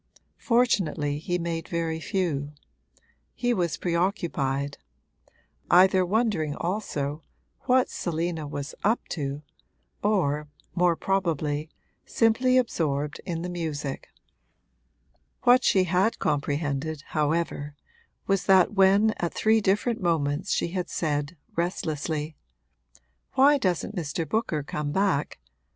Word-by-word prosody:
Fortunately 175 - +1
he 175 +3 -1
made 165 -1 -3
very 165 -1 -2
few; 160 -6 -2 0.8
he 245 0 +1
was 170 -7 -1
preoccupied 170 -6 -1 0.9
either 185 +1 +6
wondering 180 -7 0
also 155 -6 -3 0.4
what 255 0 +4
Selina 165 -2 -3
was 145 0 -5
'up 220 +4 +1
to' 145 -1 -4 0.6
or, 150 -8 +1 0.3
more 175 -1 +3
probably, 160 -6 -1 0.3
simply 250 +3 +2
absorbed 150 - -1
in 170 -2 -3
the - - -3
music. 155 -5 -4 1.4
What 250 +2 +6
she 190 - +4
had 185 +5 +1
comprehended, 145 +1 -1
however, 150 -1 -1 0.5
was 195 -1 +1
that 190 0 +5
when 200 +2 +5
at 170 - -3
three 220 0 +3
different 210 +4 +1
moments 150 -4 0
she - - +1
had 180 0 -3
said, 150 0 -2 0.2
restlessly, 155 -3 -2 1.0
'Why 280 +2 +5
doesn't 190 0 -1
Mr. 165 -1 -3
Booker 170 -5 -1
come 150 0 -3
back?' 190 -5 0
170 Hz, 105 wpm, -26 LUFS, 150-195 Hz, 1.4 s, either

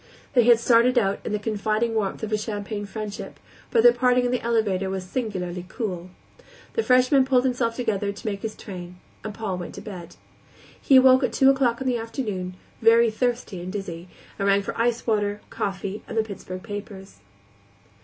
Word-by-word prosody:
They 245 -3 +5
had 235 -1 +6
started 240 +2 +4
out 200 -4 +2
in - - -4
the 210 - +1
confiding 215 +2 -1
warmth 215 -1 -2
of 220 - -3
a 215 - +2
champagne 205 -1 -4
friendship, 210 0 -7 0.3
but 225 - +3
their 240 0 +8
parting 250 0 +2
in 245 - 0
the 250 - 0
elevator 210 -5 0
was 190 -1 -3
singularly 185 -5 -3
cool. 185 -7 -4 0.6
The 455 - +1
freshman 255 - +4
pulled 260 -1 +3
himself 245 -3 0
together 210 -5 -1
to 200 +4 -12
make 200 -2 -3
his 220 -1 -4
train, 180 -3 -9 0.3
and 215 - -4
Paul 200 -3 -4
went 175 - -7
to - - -8
bed. 175 -5 -9 0.7
He 270 - +4
awoke 260 0 +7
at - - 0
two 270 0 +6
o'clock 260 -3 +1
in - - -3
the 245 -2 +1
afternoon, 210 -6 -4 0.3
very 230 0 +5
thirsty 235 -5 -2
and 180 +1 -6
dizzy, 185 -4 -6 0.3
and 200 - 0
rang 200 0 +3
for - - -4
icewater, 225 -3 0
coffee, 195 +1 -3
and - - -6
the 220 - +3
Pittsburgh 185 -3 -8
papers. 205 - -8
215 Hz, 185 wpm, -24 LUFS, 195-240 Hz, 0.7 s, their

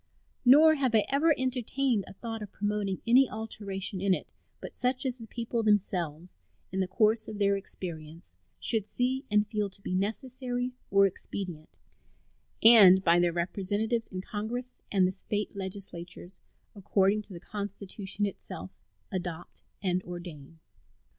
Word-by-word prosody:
Nor 300 +5 +8
have 265 -6 +1
I 215 - +4
ever 290 +4 +3
entertained 255 -3 0
a - - -10
thought 225 +2 -6
of 210 - -7
promoting 205 -2 -2
any 250 +3 +5
alteration 200 -3 -3
in 195 -1 +3
it - - -7 0.3
but - - -9
such 255 +1 0
as 255 -1 -2
the 225 - -9
people 235 +1 -3
themselves, 180 -6 0 0.3
in 190 - -2
the 190 - +1
course 215 +3 +2
of 215 - -6
their 200 -1 +3
experience, 165 - -8 0.3
should 220 -3 +1
see 260 +4 -1
and 210 0 +3
feel 210 -1 -2
to 195 - -16
be 190 - -5
necessary 245 +5 -2 0.2
or 195 0 +5
expedient, 180 -4 -5 0.9
and 200 -5 +9
by 170 0 +5
their 175 0 +3
representatives 205 +6 -1
in 185 -1 -6
Congress 235 +6 -5
and 190 -2 +4
the 185 - +1
State 205 +2 -3
legislatures, 190 -2 -6 0.4
according 200 0 +1
to 210 -1 -12
the 170 - -8
Constitution 200 +1 -4
itself, 95 - -7 0.4
adopt 175 -2 -5 0.2
and 185 -1 +1
ordain. 170 -4 -9
205 Hz, 145 wpm, -29 LUFS, 185-230 Hz, 0.9 s, and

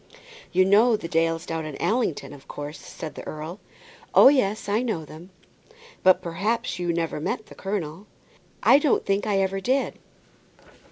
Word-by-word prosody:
"You 185 0 +4
know 215 +4 +5
the 165 - -6
Dales 165 0 0
down 165 -2 -3
at 150 - -8
Allington, 220 - -1
of 135 -1 -14
course," 145 +2 -7
said 160 - -8
the - - -8
earl. 155 +5 -6 0.6
"Oh, - - +9
yes, 220 -8 +1
I 210 +3 +1
know 220 -11 -2
them." 160 +5 -12 0.7
"But, 185 -1 +5
perhaps, 210 +6 -2
you 175 -1 0
never 165 -2 -2
met 215 +7 -3
the - - -14
colonel." 190 -1 -4 0.6
"I 275 - +7
don't 295 -3 +1
think 195 +1 0
I 205 -2 +1
ever 195 0 0
did." 265 +6 0
185 Hz, 165 wpm, -25 LUFS, 165-215 Hz, 0.7 s, Oh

